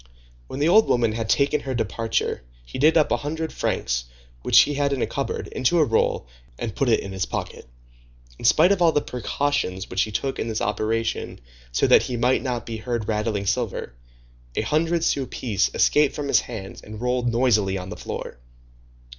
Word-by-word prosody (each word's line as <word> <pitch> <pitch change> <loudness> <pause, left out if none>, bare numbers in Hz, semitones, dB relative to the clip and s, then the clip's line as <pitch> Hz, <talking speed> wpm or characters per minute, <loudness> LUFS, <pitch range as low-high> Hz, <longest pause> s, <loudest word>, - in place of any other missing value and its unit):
When - - -7
the 150 - +2
old 215 +6 +6
woman 120 -2 +2
had 110 0 -4
taken 145 +4 +2
her 130 -2 -4
departure, 115 - -2 0.2
he - - -7
did 155 +4 +5
up 155 - +3
a - - +3
hundred 160 +5 -4
francs - - -1 0.4
which - - +6
he 145 - +1
had 140 0 0
in 130 - -2
a - - +2
cupboard, 140 - -3
into 135 +6 +1
a 155 - +5
roll, 115 - +1 0.3
and 110 -5 -5
put 135 - +1
it 115 - +3
in 100 - -7
his 95 -1 -2
pocket. - - -5 0.7
In - - -6
spite 160 +9 +5
of 195 -3 +1
all 170 -1 +5
the 150 - +2
precautions 125 -6 -2
which 95 - +1
he 110 - -1
took 135 +5 -2
in - - -2
this 110 -1 -2
operation 110 +2 -2 0.3
so - - +2
that - - +6
he 125 - -3
might 125 +3 +2
not 125 -3 -3
be 115 -1 -5
heard 115 -1 -3
rattling 105 -2 -1
silver, 80 - -2 0.6
a - - 0
hundred 165 +2 +1
sou 135 -2 0
piece 105 -6 -1
escaped 150 -2 +3
from 145 -1 -4
his - - +5
hands 100 -5 -8
and 105 0 -10
rolled 125 0 0
noisily 110 -5 +2
on 90 0 -7
the - - -6
floor. - - -7
120 Hz, 200 wpm, -23 LUFS, 110-145 Hz, 0.7 s, old